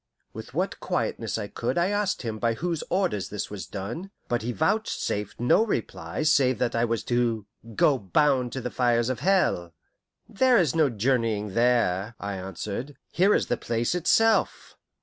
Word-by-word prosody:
With - - -9
what - - -1
quietness - - -2
I - - -4
could - - -3
I 175 +2 +2
asked 205 -7 -1
him 110 -2 -4
by 115 0 +1
whose 170 +3 -2
orders 180 - 0
this 105 0 -5
was 105 -2 -6
done; 115 - -6 0.2
but 120 -2 0
he 120 +3 -2
vouchsafed 160 - -1
no 120 - +4
reply 105 - -3
save 135 -5 +3
that 120 +1 0
I 115 - +1
was 115 -2 -2
to 120 -3 0 0.3
"go 135 +3 +3
bound 125 - +2
to 130 -2 -3
fires 120 -1 +2
of 130 - -2
hell." 135 - +1 0.5
"There 255 +3 +3
is 165 -9 +2
no 155 -3 +3
journeying 115 -3 0
there," 115 -3 +1
I 100 0 -4
answered; 100 - -5 0.2
"here 195 +4 +4
is - - +1
the - - -1
place 115 +3 -1
itself." 220 +6 +2
120 Hz, 170 wpm, -26 LUFS, 105-160 Hz, 0.5 s, no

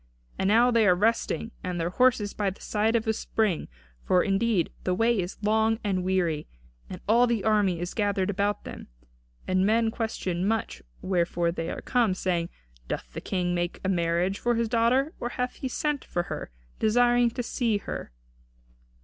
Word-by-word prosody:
And 190 - +1
now 235 +4 +5
they 230 -3 +4
are 180 - +6
resting 225 +5 +1
themselves - - -30
and 180 -1 -3
their 165 +1 0
horses 235 -2 +2
by 205 -2 0
the 190 - -10
side 220 +2 0
of 225 - +1
a 220 - +1
spring, 215 -5 -1 0.4
for 180 -1 +3
indeed 195 -2 +1
the 185 - 0
way 230 +2 +2
is 180 +1 -3
long 220 +1 +2
and 190 -3 0
weary. 175 -5 0 0.4
And 180 - -8
all 235 +3 +5
the 230 -4 0
army 205 -5 +2
is 175 +1 -4
gathered 205 -2 0
about 205 +1 -1
them. - - -9 0.6
And 185 0 +2
men 225 +2 +2
question 190 -6 -2
much 225 0 -1 0.2
wherefore 175 -2 +1
they 165 -1 -4
are - - -5
come, 235 -7 +2
saying, 175 -2 -1 0.4
'Doth - - -5
the - - -5
King 180 -2 -1
make 175 0 -2
a - - +1
marriage 175 +2 0
for 240 0 +1
his 230 0 0
daughter; 245 +7 +2
or 240 - -3
hath 250 0 -3
he 265 - -3
sent 295 +2 -2
for 175 - -2
her, - - -6 0.3
desiring 240 +2 +4
to 245 +2 -4
see 230 -2 0
her?'" 200 - -6
205 Hz, 185 wpm, -27 LUFS, 180-230 Hz, 0.6 s, are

